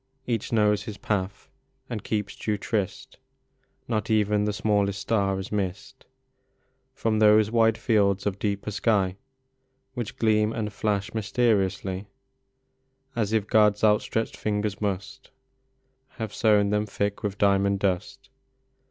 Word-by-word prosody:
Each 115 -4 -2
knows 105 -2 +3
his 105 -1 -7
path 100 -2 -3 0.4
and 115 -6 -5
keeps 105 -2 -2
due 105 -1 -2
tryst; 100 -1 -3 0.7
Not 110 -3 -2
even 105 -1 +2
the 105 - 0
smallest 100 -1 0
star 100 -4 0
is 95 +1 -6
missed 105 +7 -4 0.9
From 110 -4 0
those 105 0 +5
wide 115 -1 +3
fields 100 -4 +2
of 100 -1 -2
deeper 100 0 -2
sky 100 -2 +1 0.8
Which 120 -4 -5
gleam 110 -1 +2
and 105 -2 -3
flash 105 +1 -1
mysteriously, 100 -3 0 1.1
As 110 -3 0
if 110 -3 +1
God 105 -1 +4
s 105 - -16
outstretched 110 +1 +1
fingers 105 -1 -2
must 105 +7 -4 0.9
Have 110 -4 -4
sown 105 -4 +3
them 105 0 0
thick 100 0 -2
with 105 -2 -3
diamond 100 0 +3
dust. 95 -3 -2
105 Hz, 130 wpm, -26 LUFS, 100-110 Hz, 1.1 s, those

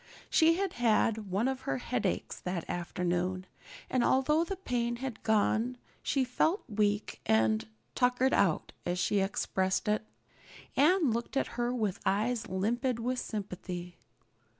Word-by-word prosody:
She 330 0 +5
had 385 0 -1
had 220 -3 +2
one 200 +7 +1
of 265 0 -2
her - - +1
headaches 245 -6 -2
that 180 -2 -4
afternoon, 180 +1 -2 0.4
and 255 -2 +1
although 300 +6 +3
the 390 +3 -3
pain 240 -10 -1
had 255 -1 -5
gone 220 +3 +2 0.2
she 270 - +1
felt 315 - +1
weak 210 -1 0
and 110 0 +3 0.3
"tuckered 250 +1 +2
out," 190 -6 +2
as 175 +1 -1
she 200 +3 +2
expressed 190 0 0
it. 210 +1 +1 0.7
Anne 310 -1 +4
looked 235 +4 -2
at - - +1
her 240 0 0
with 215 -6 -1
eyes 225 +3 0
limpid 230 +6 0
with 250 +2 -1
sympathy. 180 -5 -5
225 Hz, 140 wpm, -31 LUFS, 190-255 Hz, 0.7 s, She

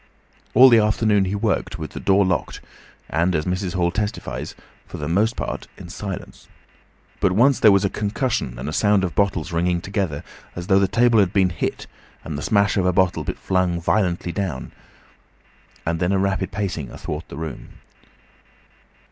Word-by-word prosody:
All 130 +1 +9
the 115 -2 +6
afternoon 105 -2 +2
he 95 +2 -2
worked 100 -3 -1
with 80 -3 -6
the - - -7
door 100 0 +3
locked 90 -2 -1 0.5
and, 85 +3 +1
as 75 0 0
Mrs. 90 0 -2
Hall 85 -1 +1
testifies, 105 +2 -4 0.3
for - - -8
the 75 - -4
most 105 +7 +1
part - - -4
in - - -10
silence. - - -7 0.7
But 95 -2 +2
once 125 +7 +4
there 110 - +7
was 100 0 +3
a - - +1
concussion 105 - -2
and 65 +4 -5
a 75 - -3
sound 105 0 +3
of 90 - -2
bottles 95 -6 0
ringing 85 +1 +1
together 90 -5 -3 0.3
as 90 - -5
though 95 0 +4
the 100 - +3
table 120 +2 +3
had 95 -4 +3
been 95 -3 +3
hit, - - -3 0.4
and 80 - -5
the 75 - -4
smash 100 +2 +2
of 95 - +2
a - - +4
bottle 90 0 +1
flung 90 -2 -1
violently 90 -1 0
down, 85 -8 -4 1.1
and 85 0 -1
then 90 +2 +1
a 100 - +2
rapid 95 -1 -1
pacing 95 -9 -3
athwart 75 +2 -6
the 70 - -9
room. 80 -4 -7
95 Hz, 180 wpm, -22 LUFS, 85-100 Hz, 1.1 s, All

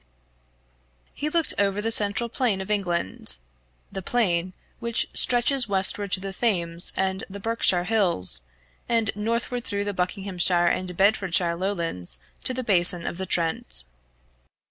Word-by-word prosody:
He 300 - -4
looked 330 0 +1
over 200 0 0
the 225 +2 -2
central 210 +2 +2
plain 235 -4 -1
of 190 +2 -6
England 175 - -2 0.5
the 195 - -6
plain 185 -5 0 0.3
which 235 -1 0
stretches 245 +1 +4
westward 195 0 0
to - - +5
the 195 0 -6
Thames 175 -6 -1
and 190 0 -2
the 200 +1 -9
Berkshire 200 -4 0
hills, 180 - +1 0.5
and 225 -2 +1
northward 230 +3 -3
through 200 -3 -3
the 205 0 -3
Buckinghamshire 180 -1 0
and 180 0 -2
Bedfordshire 185 -4 +1
lowlands 170 - -4 0.3
to - - +3
the 255 0 -4
basin 175 -5 +7
of 170 - -5
the 190 - -4
Trent. 165 - 0
195 Hz, 140 wpm, -24 LUFS, 175-225 Hz, 0.5 s, basin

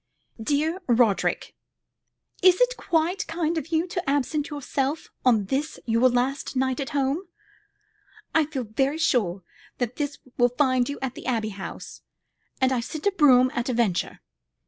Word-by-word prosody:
"Dear 305 +9 0
Roderick, 235 -4 +2 0.9
Is 365 -1 +6
it - - +3
quite 335 0 0
kind 330 0 -1
of 320 - -3
you 325 0 +1
to 355 -4 -3
absent 290 +2 0
yourself 285 0 -2
on 225 -5 +3
this 275 +9 -2
your 230 +2 +4
last 255 +3 -1
night 260 +1 0
at 270 -3 -3
home? 280 +7 -1 1.1
I 315 -2 +3
feel 275 -5 -3
very 270 +7 0
sure 205 - +1 0.3
that 245 -1 -3
this 290 -1 -2 0.2
will 245 0 +5
find 255 -3 +2
you 285 - -4
at 260 -2 -2
the - - -9
Abbey 225 -4 0
House, 195 -2 -8 0.6
and 260 0 +3
I 255 - +1
send 295 +6 -6
the 405 - +3
brougham 255 -8 +5
at 240 +2 -2
a - - 0
venture. 225 -7 0
270 Hz, 160 wpm, -25 LUFS, 245-315 Hz, 1.1 s, Is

